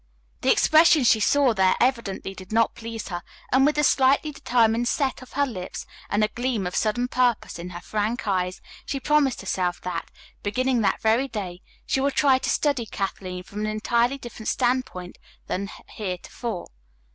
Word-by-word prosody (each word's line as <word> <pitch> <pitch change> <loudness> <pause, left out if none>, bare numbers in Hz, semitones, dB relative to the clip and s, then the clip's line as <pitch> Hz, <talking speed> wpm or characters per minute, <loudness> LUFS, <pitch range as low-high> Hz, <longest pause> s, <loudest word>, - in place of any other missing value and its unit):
The - - +4
expression 315 -2 +5
she 225 -2 +5
saw 270 +3 +3
there 190 -2 +3
evidently 235 -6 0
did 185 0 -12
not 225 +1 +3
please 230 -2 -7
her, 175 -2 -4 0.3
and 270 +2 +5
with 300 - +1
a 300 - +3
slightly 275 +2 +3
determined 240 -3 +2
set 265 -1 0
of 255 - -13
her 285 +1 +2
lips 185 -9 -6 0.2
and 210 +1 +2
a - - +4
gleam 240 -5 -2
of 180 - -4
sudden 240 +3 +1
purpose 245 -7 0
in 175 +1 -6
her 175 -1 -8
frank 215 +5 -2
eyes, 185 -2 -1 0.2
she 275 - -3
promised 285 -1 +2
herself 180 -2 -1
that, 180 -2 -4 0.3
beginning 250 +4 +1
that 205 - +1
very 225 +5 +3
day, 190 -7 -6 0.2
she 265 - 0
would 275 0 0
try 270 -3 +4
to - - -2
study 275 -6 +1
Kathleen 185 -3 -4
from 205 +3 -8
an 215 - -1
entirely 235 +4 +1
different 240 -4 -9
standpoint 245 -8 -1 0.3
than 195 +1 -3 0.2
heretofore. 195 +1 -5
230 Hz, 175 wpm, -25 LUFS, 195-260 Hz, 0.3 s, expression